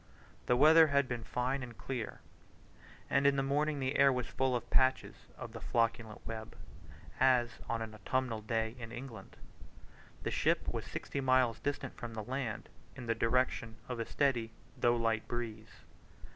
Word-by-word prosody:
The 125 - +4
weather 160 +3 +8
had 140 -2 +2
been 120 -2 -3
fine 125 +4 -1
and 120 -3 -8
clear, 125 -5 -5 0.9
and 140 0 +3
in 140 - +4
the 135 - +1
morning 145 +2 +1
the 130 +1 0
air 140 0 +6
was 125 -2 -1
full 130 0 0
of 120 -1 -3
patches 130 0 +3 0.2
of - - -7
the - - -7
flocculent 115 -2 -1
web, 110 -1 -6 0.6
as 125 -3 +3
on 115 -1 -1
an 110 -1 -8
autumnal 115 +2 -1
day 110 +1 -1
in 115 -1 -7
England. 120 -5 -9 0.9
The - - -2
ship - - +1
was - - -3
sixty 140 - -4
miles 130 -3 +3
distant 140 -2 -3
from 115 -1 -6
the 110 - -4
land, 125 -2 -3 0.3
in 125 - -7
the 115 - +1
direction 115 0 0
of 125 -2 -4
a 115 - -1
steady 125 -6 +1 0.3
though 120 0 +3
light 115 -1 0
breeze. 110 -2 -4
125 Hz, 170 wpm, -33 LUFS, 115-130 Hz, 0.9 s, weather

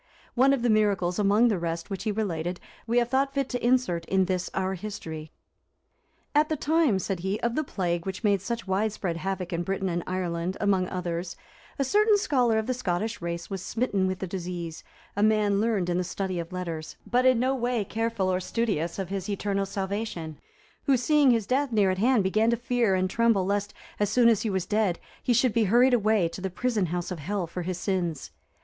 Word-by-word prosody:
One 265 +2 +4
of 270 -4 +1
the 240 - +2
miracles, 200 -4 +2
among 210 +4 +4
the 205 -5 0
rest, 165 +2 -4
which 195 +2 -4
he 215 - +1
related, 180 -4 -2 0.3
we 235 +2 +1
have 240 -1 +2
thought 275 +2 +1
fit 275 -1 0
to 245 - -3
insert 240 -9 +2
in 190 +1 +2
this 185 0 -2
our 190 0 0
history. 165 -6 -7 1.0
"At 300 +1 +3
the 310 - +1
time," 305 -6 +2
said 190 -1 -3
he, 190 +4 -2
"of 235 0 0
the 310 - 0
plague 175 - -2
which 190 +3 -5
made 200 -3 +3
such 230 +3 -4
widespread 190 -3 -1
havoc 185 0 -3
in 170 - -1
Britain 195 +1 -2
and 175 0 -1
Ireland, 180 -1 -2
among 195 -3 +2
others, 175 -1 -3 0.4
a 275 - +1
certain 420 - +4
scholar 250 - +2
of 220 - 0
the 255 - 0
Scottish 220 -2 -2
race 170 0 -4
was 195 -2 -3
smitten 205 -5 0
with 185 0 -2
the 190 - -4
disease, 175 -3 -5 0.3
a 205 - -1
man 210 -2 +3
learned 215 -5 +1
in 175 0 0
the - - 0
study 185 0 -3
of 170 +1 -6
letters, 170 -4 -5
but 250 +1 +2
in 255 -2 +4
no 260 +2 +2
way 240 -4 -1
careful 225 -2 -1
or 180 - +1
studious 185 -5 -1
of 190 -3 -4
his 195 +1 -4
eternal 200 -1 -1
salvation; 190 -6 -4 0.5
who, 275 -3 +4
seeing 290 +3 +4
his 230 -4 +3
death 265 +4 0
near 205 -4 +3
at 185 - -3
hand, 240 -1 +3
began 215 +4 +2
to 235 - +2
fear 240 -4 +1
and 185 0 +1
tremble 230 -5 +3
lest, 205 +1 -1 0.3
as 205 -1 +2
soon 235 +2 +5
as 225 -4 +3
he 225 - -1
was 190 -2 -1
dead, 205 -3 +1 0.2
he - - 0
should 240 0 +3
be 230 -2 +3
hurried 245 +6 +4
away 215 -5 +3
to 170 - -8
the 190 - -2
prison 210 0 0
house 175 +2 -3
of 180 - -4
Hell 190 +5 -2
for 175 +2 -6
his 180 0 -3
sins. 175 -6 -2
200 Hz, 215 wpm, -27 LUFS, 180-235 Hz, 1.0 s, soon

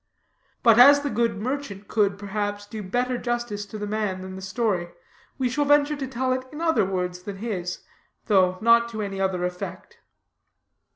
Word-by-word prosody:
But 230 -2 +6
as 285 +3 +9
the 285 -1 -3
good 230 -1 0
merchant 225 -4 -4
could, 200 -2 +1
perhaps, 205 0 -3
do 215 +1 -7
better 245 +5 -1
justice 240 -4 -3
to 215 - -7
the 210 - -4
man 205 -3 -2
than 185 0 -7
the 190 - -8
story, 190 -2 -1 0.5
we 260 -2 +1
shall 290 +4 0
venture 290 +1 +3
to 275 -2 -4
tell 255 0 -1
it 255 0 -2
in 300 - -8
other 325 -6 +2
words 180 -1 -3
than 195 +1 -7
his, 190 -5 -4 0.4
though 185 -4 +3
not 235 +1 +5
to 220 -2 -4
any 195 -1 -4
other 185 -2 0
effect. 180 0 -7
215 Hz, 180 wpm, -25 LUFS, 195-245 Hz, 0.5 s, as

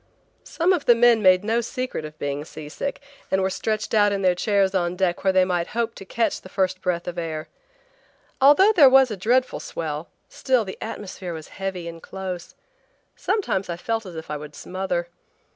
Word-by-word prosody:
Some 350 +3 +1
of 340 -6 -1
the 240 - +6
men 235 -1 +5
made 185 -1 +5
no 225 +3 +1
secret 255 - -4
of 155 0 -10
being 145 0 -3
seasick 155 - -6 0.3
and 190 - +2
were 190 0 0
stretched 215 +2 -2
out 205 -1 +4
in 200 -1 -1
their 185 -1 +4
chairs 195 +1 +1
on 175 -2 0
deck 180 -1 0
where 190 - +4
they 185 -1 +4
might 175 -2 -1
hope 230 -1 0
to 195 - -11
catch 230 +4 -1
the 185 - -12
first 185 -1 -1
breath 175 -2 -2
of 175 0 -4
air. 160 -2 -4 0.9
Although 295 +10 +7
there 310 -10 +7
was 265 -2 +5
a - - -2
dreadful 245 +7 +1
swell, 155 0 -5 0.2
still 255 -4 0
the 190 - -8
atmosphere 190 -5 -6
was 160 -1 -9
heavy 190 -3 -5
and 165 0 -8
close. 185 -2 -7 0.6
Sometimes 200 - -1
I 170 - -3
felt 225 +3 -3
as 175 - -9
if 160 -1 -7
I 150 - -2
would 150 0 -10
smother. 180 -2 -3
190 Hz, 195 wpm, -23 LUFS, 175-225 Hz, 0.9 s, Although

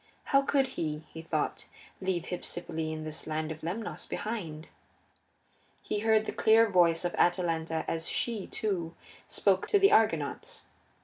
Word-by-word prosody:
How 275 -1 +4
could 275 0 +2
he, 155 -9 -3
he 160 - -7
thought, 160 -2 -2 0.3
leave 185 -3 0
Hypsipyle 165 -3 -3
and 155 0 -5
this 155 -1 -5
land 155 0 -2
of 155 - -7
Lemnos 200 +7 -4
behind? 170 -9 -4 1.1
He 210 - -2
heard 220 0 +3
the - - -2
clear 225 +1 +5
voice 175 -4 +3
of 175 - -1
Atalanta 165 -2 +1
as 165 0 -2
she, 225 -5 -2
too, 175 -6 -2 0.3
spoke 190 -2 +1
to 410 - +4
the 395 0 +5
Argonauts. 165 -10 +1
175 Hz, 145 wpm, -30 LUFS, 160-215 Hz, 1.1 s, clear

